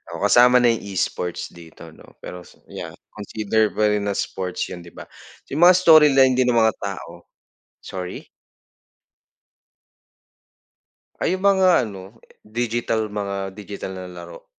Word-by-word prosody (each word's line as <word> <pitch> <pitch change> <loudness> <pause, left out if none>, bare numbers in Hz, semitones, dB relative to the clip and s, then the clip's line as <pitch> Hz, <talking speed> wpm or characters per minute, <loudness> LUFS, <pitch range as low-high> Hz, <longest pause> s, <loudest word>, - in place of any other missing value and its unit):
Oo, 90 - -6
kasama 125 +4 +5
na 120 - +5
yung 115 - -2 0.2
e-sports 90 0 -3
dito, 85 -2 -14
'no. - - -19
Peros 90 0 -10 0.2
yeah, - - -8 0.3
consider 110 +1 -1
pa 105 0 +2
rin 105 -1 -1
na 100 - -2
sports 90 -1 -4
yun, 90 - -7
di 85 - -15
ba? - - -10 0.5
Yung 145 - -3
mga 180 - +7
storyline 150 -7 +5
din 130 -1 +2
ng 120 - +2
mga 110 - +2
tao, 90 -3 -8 0.5
sorry? 90 -1 -8 2.9
Ay, 185 - 0
yung 190 - -6
mga 190 -6 +4
ano 100 0 -9 0.3
digital, 115 -1 -2
mga 100 -2 -4
digital 100 -2 -7
na 90 0 -7
laro. 85 -1 -12
105 Hz, 140 wpm, -21 LUFS, 95-125 Hz, 2.9 s, mga